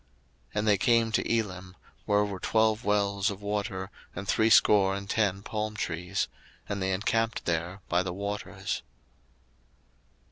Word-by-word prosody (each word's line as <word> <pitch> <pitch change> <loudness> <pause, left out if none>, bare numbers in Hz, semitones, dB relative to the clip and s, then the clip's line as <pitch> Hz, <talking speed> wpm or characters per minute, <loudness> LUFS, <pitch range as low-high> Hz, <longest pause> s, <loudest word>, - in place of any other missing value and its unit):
02:015:027 - - -36
And 105 +1 +1
they 105 -2 +5
came 115 0 +3
to - - 0
Elim, 95 -5 -2 0.3
where 105 0 +3
were 100 -2 -5
twelve 110 +1 +2
wells 100 0 +1
of 100 0 -7
water, 100 -2 -3 0.2
and 100 - -5
threescore 105 -3 +5
and 100 0 -6
ten 100 -2 0
palm 110 0 -3
trees: 90 -1 -2 0.4
and 100 -1 -3
they 95 0 0
encamped 115 +4 0
there 85 +3 -2
by 90 +1 +2
the 95 -1 -3
waters. 100 +2 -4
100 Hz, 145 wpm, -28 LUFS, 95-105 Hz, 0.4 s, they